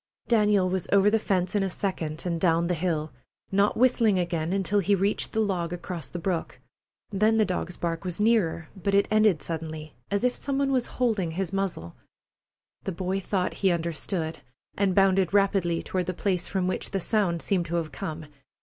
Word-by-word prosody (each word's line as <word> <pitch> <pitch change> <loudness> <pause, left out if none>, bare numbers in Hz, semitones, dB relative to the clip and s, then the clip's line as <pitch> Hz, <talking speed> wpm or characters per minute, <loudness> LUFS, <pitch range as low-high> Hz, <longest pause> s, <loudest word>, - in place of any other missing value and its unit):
Daniel 210 -4 +3
was 185 -1 -2
over 200 +1 +5
the 225 - +3
fence 185 -4 0
in 205 - +2
a 195 - 0
second 170 -5 -3
and 170 -2 -2
down 170 -1 +3
the 180 - 0
hill, 160 -2 -1 0.4
not 200 +1 +2
whistling 230 -4 +4
again 170 -2 -1
until 195 +1 +1
he 200 +1 +3
reached 195 +2 0
the 220 - -1
log 185 -6 0
across 175 -3 -5
the - - -6
brook. 175 -1 -3 0.5
Then 215 +3 +3
the 215 - +4
dog's 180 -1 -3
bark 165 0 -2
was 180 -1 -4
nearer, 205 -8 +2
but 200 +1 -1
it 200 - +4
ended 215 -6 +3
suddenly, 160 -2 -5 0.2
as 200 +2 0
if 250 0 +2
some 275 -1 -2
one 275 0 +1
was 255 -2 +1
holding 220 -9 +1
his 190 +1 -3
muzzle. 185 - -3 0.9
The 195 - -2
boy 185 +2 -2
thought 190 -1 -1
he 195 - +4
understood, 170 0 -2 0.4
and 195 -2 +1
bounded 195 -1 +3
rapidly 195 -4 +2
toward 180 -2 -2
the 185 - -2
place 185 -3 -1
from 190 -2 -1
which 185 - -1
the 195 - -1
sound 185 -4 +1
seemed 180 -4 0
to 170 - -3
have 165 -3 -2
come. 160 -4 -5
185 Hz, 195 wpm, -26 LUFS, 170-200 Hz, 0.9 s, over